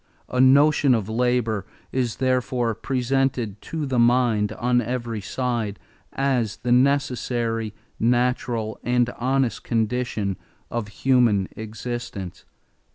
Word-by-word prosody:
A 125 Hz, -, +1 dB
notion 140 Hz, 0 st, +5 dB
of 105 Hz, -4 st, -2 dB
labor 115 Hz, -3 st, 0 dB, 0.2 s
is 125 Hz, -3 st, -1 dB
therefore 125 Hz, -2 st, 0 dB
presented 125 Hz, -3 st, -1 dB
to 160 Hz, -2 st, -4 dB
the 130 Hz, -3 st, 0 dB
mind 120 Hz, -3 st, +3 dB
on 120 Hz, +2 st, +1 dB
every 115 Hz, -2 st, -3 dB
side 115 Hz, -1 st, -2 dB, 0.4 s
as 125 Hz, -6 st, 0 dB
the 120 Hz, -, 0 dB
necessary, 120 Hz, -4 st, +1 dB, 0.2 s
natural, 120 Hz, -2 st, 0 dB
and 125 Hz, 0 st, +2 dB
honest 130 Hz, 0 st, 0 dB
condition 110 Hz, -4 st, -1 dB, 0.3 s
of 120 Hz, -3 st, -2 dB
human 110 Hz, -4 st, +2 dB
existence." 110 Hz, -3 st, -6 dB
120 Hz, 105 wpm, -24 LUFS, 110-130 Hz, 0.4 s, notion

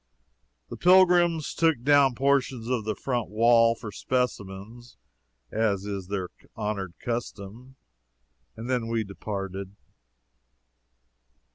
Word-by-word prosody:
The -, -, -6 dB
pilgrims 175 Hz, -3 st, +4 dB
took 160 Hz, -7 st, +1 dB
down 140 Hz, -2 st, +4 dB
portions 135 Hz, -3 st, 0 dB
of 120 Hz, -4 st, -1 dB
the 110 Hz, -1 st, -2 dB
front 120 Hz, -2 st, -3 dB
wall 115 Hz, +1 st, +4 dB
for 115 Hz, -2 st, -8 dB
specimens, 120 Hz, -1 st, -4 dB, 0.5 s
as 105 Hz, -3 st, 0 dB
is 100 Hz, -3 st, -5 dB
their 95 Hz, -2 st, -3 dB, 0.3 s
honored 100 Hz, -5 st, -4 dB
custom, 120 Hz, +1 st, -6 dB, 0.8 s
and 115 Hz, +2 st, -7 dB
then 125 Hz, -3 st, -1 dB
we 115 Hz, -1 st, -1 dB
departed. 100 Hz, 0 st, -6 dB
115 Hz, 105 wpm, -26 LUFS, 100-130 Hz, 0.8 s, pilgrims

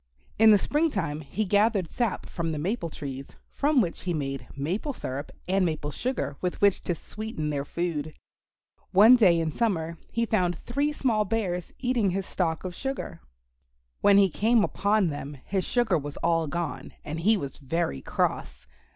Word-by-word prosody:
In 220 Hz, 0 st, +8 dB
the 210 Hz, -, +8 dB
spring 300 Hz, -, +1 dB
time 170 Hz, -, -2 dB
he 175 Hz, +9 st, -3 dB
gathered 205 Hz, -2 st, +2 dB
sap 235 Hz, -5 st, -1 dB
from 165 Hz, -2 st, -3 dB
the 155 Hz, -, -3 dB
maple 170 Hz, +3 st, -2 dB
trees, 135 Hz, -3 st, -6 dB, 0.2 s
from 290 Hz, -2 st, +3 dB
which 175 Hz, -5 st, -3 dB
he 175 Hz, -2 st, -2 dB
made 135 Hz, -2 st, -4 dB
maple 185 Hz, -, -2 dB
syrup 140 Hz, -, -5 dB, 0.2 s
and 190 Hz, +1 st, +2 dB
maple 155 Hz, -3 st, -1 dB
sugar 230 Hz, -, -3 dB
with 180 Hz, -1 st, -2 dB
which 200 Hz, -2 st, +3 dB
to 175 Hz, -, 0 dB
sweeten 205 Hz, -5 st, -5 dB
their 140 Hz, -1 st, -1 dB
food. 155 Hz, -2 st, -3 dB, 0.8 s
One 215 Hz, +6 st, +9 dB
day 185 Hz, -8 st, +5 dB
in 160 Hz, -1 st, -1 dB
summer 170 Hz, -6 st, -1 dB
he 230 Hz, 0 st, 0 dB
found 180 Hz, -6 st, +1 dB
three 285 Hz, -, -1 dB
small 235 Hz, -7 st, +1 dB
bears 185 Hz, -5 st, -2 dB
eating 245 Hz, -5 st, +1 dB
his 190 Hz, +1 st, -2 dB
stock 165 Hz, -4 st, -1 dB
of 185 Hz, -1 st, -4 dB
sugar. 265 Hz, -7 st, -5 dB, 0.8 s
When 200 Hz, -1 st, +5 dB
he 195 Hz, -2 st, +5 dB
came 225 Hz, +5 st, +3 dB
upon 205 Hz, -3 st, +2 dB
them, 145 Hz, -1 st, -6 dB
his 190 Hz, -2 st, -1 dB
sugar 240 Hz, -9 st, +2 dB
was 145 Hz, 0 st, -7 dB
all 165 Hz, -1 st, +2 dB
gone, 170 Hz, +4 st, -4 dB
and 155 Hz, +2 st, -4 dB
he 215 Hz, +6 st, +4 dB
was 140 Hz, -7 st, -6 dB
very 140 Hz, -, -2 dB
cross. -, -, -2 dB
180 Hz, 175 wpm, -27 LUFS, 160-220 Hz, 0.8 s, One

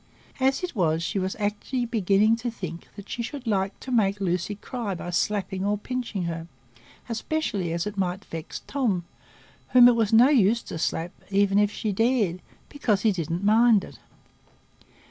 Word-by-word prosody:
As 265 Hz, +5 st, +1 dB
it 355 Hz, -5 st, -4 dB
was, 165 Hz, -4 st, +1 dB
she 195 Hz, -, -1 dB
was 190 Hz, 0 st, -2 dB
actually 210 Hz, +4 st, -2 dB
beginning 215 Hz, -1 st, +3 dB
to 240 Hz, +1 st, -3 dB
think 180 Hz, -7 st, -7 dB
that 205 Hz, -1 st, -10 dB
she 240 Hz, -, -4 dB
should 260 Hz, +2 st, -6 dB
like 195 Hz, -3 st, -1 dB
to 260 Hz, -, -7 dB
make 205 Hz, -4 st, +2 dB
Lucy 180 Hz, +1 st, -1 dB
cry 210 Hz, -1 st, -4 dB
by 175 Hz, +1 st, -6 dB
slapping 190 Hz, +1 st, -1 dB
or 205 Hz, +1 st, +1 dB
pinching 230 Hz, -3 st, -4 dB
her, 165 Hz, -1 st, -4 dB, 0.6 s
especially 225 Hz, -, -2 dB
as 170 Hz, +1 st, -1 dB
it 210 Hz, -1 st, -5 dB
might 185 Hz, +1 st, -2 dB
vex 165 Hz, 0 st, -7 dB
Tom, 215 Hz, -11 st, -1 dB, 0.7 s
whom 245 Hz, -1 st, +9 dB
it 245 Hz, -, +5 dB
was 225 Hz, -3 st, +1 dB
of 220 Hz, -, +6 dB
no 250 Hz, +4 st, +7 dB
use 235 Hz, -4 st, +3 dB
to 160 Hz, -, -6 dB
slap, 165 Hz, +2 st, -1 dB, 0.2 s
even 200 Hz, 0 st, +3 dB
if 205 Hz, 0 st, +3 dB
she 215 Hz, 0 st, -2 dB
dared, 210 Hz, -4 st, +1 dB, 0.3 s
because 215 Hz, -9 st, 0 dB
he 220 Hz, -, +4 dB
didn't 170 Hz, 0 st, -3 dB
mind 220 Hz, 0 st, +5 dB
it. -, -, -12 dB
205 Hz, 180 wpm, -25 LUFS, 185-235 Hz, 0.7 s, whom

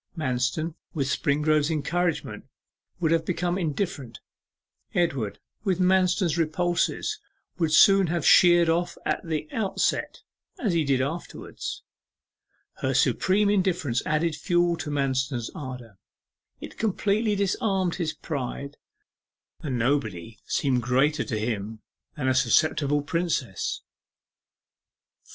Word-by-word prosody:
Manston 130 Hz, +3 st, -1 dB, 0.2 s
with 140 Hz, -3 st, 0 dB
Springrove's 150 Hz, +2 st, +1 dB
encouragement 165 Hz, +2 st, -2 dB, 0.5 s
would 165 Hz, -3 st, +1 dB
have 165 Hz, -1 st, +2 dB
become 175 Hz, +1 st, -1 dB
indifferent. 150 Hz, -, -3 dB, 0.8 s
Edward 140 Hz, -, 0 dB, 0.3 s
with 190 Hz, -4 st, 0 dB
Manston's 185 Hz, -2 st, +2 dB
repulses 175 Hz, +2 st, 0 dB, 0.4 s
would 165 Hz, -3 st, +1 dB, 0.4 s
have 170 Hz, -3 st, -1 dB
sheered 175 Hz, -2 st, +6 dB
off 170 Hz, +2 st, 0 dB
at -, -, -1 dB
the 155 Hz, -2 st, -3 dB
outset, 210 Hz, -4 st, -1 dB, 0.3 s
as 215 Hz, -8 st, 0 dB
he 165 Hz, -2 st, +2 dB
did 135 Hz, -2 st, +1 dB
afterwards. 160 Hz, +6 st, -5 dB, 0.9 s
Her -, -, -1 dB
supreme 200 Hz, +2 st, +3 dB
indifference 180 Hz, -, +1 dB
added 155 Hz, +1 st, 0 dB
fuel 175 Hz, +2 st, +1 dB
to 150 Hz, -, -5 dB
Manston's 130 Hz, -4 st, -1 dB
ardour 125 Hz, -, -8 dB, 0.6 s
it -, -, -10 dB
completely 210 Hz, 0 st, +1 dB
disarmed 195 Hz, -2 st, 0 dB
his 165 Hz, -4 st, -1 dB
pride. 140 Hz, -1 st, -5 dB, 0.8 s
The 160 Hz, -, -7 dB
invulnerable 125 Hz, -1 st, +1 dB
Nobody 110 Hz, -4 st, -8 dB
seemed 130 Hz, -3 st, +1 dB
greater 135 Hz, +6 st, +2 dB
to 115 Hz, -, -3 dB
him 110 Hz, -1 st, -4 dB, 0.3 s
than 130 Hz, -3 st, -1 dB
a 130 Hz, -, +3 dB
susceptible 145 Hz, +3 st, +2 dB
Princess. 155 Hz, -, -2 dB, 1.4 s
4. -, -, -25 dB
155 Hz, 115 wpm, -26 LUFS, 130-175 Hz, 1.4 s, sheered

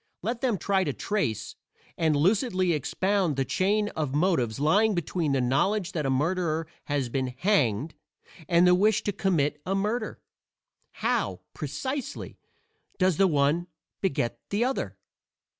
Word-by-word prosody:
Let 230 Hz, +4 st, -2 dB
them 245 Hz, -6 st, +1 dB
try 190 Hz, +2 st, +1 dB
to 145 Hz, -5 st, -2 dB
trace 115 Hz, -, -2 dB, 0.4 s
and 160 Hz, -2 st, +2 dB
lucidly 185 Hz, -, +2 dB
expound 185 Hz, +3 st, 0 dB
the 135 Hz, 0 st, 0 dB
chain 205 Hz, +7 st, +1 dB
of 150 Hz, -7 st, -3 dB
motives 145 Hz, -, +1 dB
lying 200 Hz, +9 st, +3 dB
between 170 Hz, -2 st, -1 dB
the 135 Hz, -, +2 dB
knowledge 175 Hz, +10 st, +1 dB
that 150 Hz, -5 st, -2 dB
a -, -, 0 dB
murderer 160 Hz, +3 st, 0 dB, 0.2 s
has 145 Hz, -3 st, -1 dB
been 130 Hz, +2 st, -1 dB
hanged 150 Hz, -, +1 dB, 0.6 s
and 170 Hz, 0 st, +5 dB
the 180 Hz, -, +6 dB
wish 210 Hz, +4 st, +3 dB
to 205 Hz, -, 0 dB
commit 155 Hz, -7 st, 0 dB
a 195 Hz, -, -1 dB
murder. 215 Hz, +3 st, -2 dB, 0.9 s
How, -, -, 0 dB
precisely, 230 Hz, -, -5 dB, 0.6 s
does 185 Hz, -4 st, +2 dB
the 195 Hz, -, +5 dB
one 150 Hz, +2 st, +2 dB, 0.3 s
beget 135 Hz, -10 st, -1 dB
the 210 Hz, +4 st, +1 dB
other? 265 Hz, +1 st, -2 dB
175 Hz, 140 wpm, -27 LUFS, 145-200 Hz, 0.9 s, the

